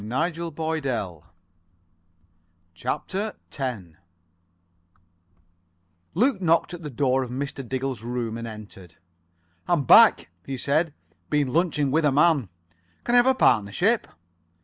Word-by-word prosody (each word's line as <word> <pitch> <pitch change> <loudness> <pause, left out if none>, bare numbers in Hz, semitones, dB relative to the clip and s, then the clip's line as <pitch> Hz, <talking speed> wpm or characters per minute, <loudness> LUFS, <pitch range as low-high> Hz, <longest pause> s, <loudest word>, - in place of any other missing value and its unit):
[Pg 130 - -1
70 165 -2 -6
71] 130 - -2 1.5
CHAPTER 195 - -3 0.2
X 125 -8 -3 2.3
Luke 220 +1 +2
knocked 170 0 +2
at 175 - -7
the 150 - -6
door 130 0 +1
of 125 - -4
Mr. 135 +2 -5
Diggle's 130 -3 -3
room, 120 -1 -3
and 115 0 -6
entered. 100 -6 -11 0.7
"I'm 170 -5 +2
back," 115 - +6
he 135 +6 -5
said. 150 +4 0 0.3
"Been 145 -3 +1
lunching 155 -4 +1
with 160 +2 +2
a 145 - +4
man. 145 - +3 0.5
Can 240 - -1
I - - +6
have 245 - +3
a 265 - +4
partnership?" 130 - +2
140 Hz, 125 wpm, -25 LUFS, 120-165 Hz, 2.3 s, back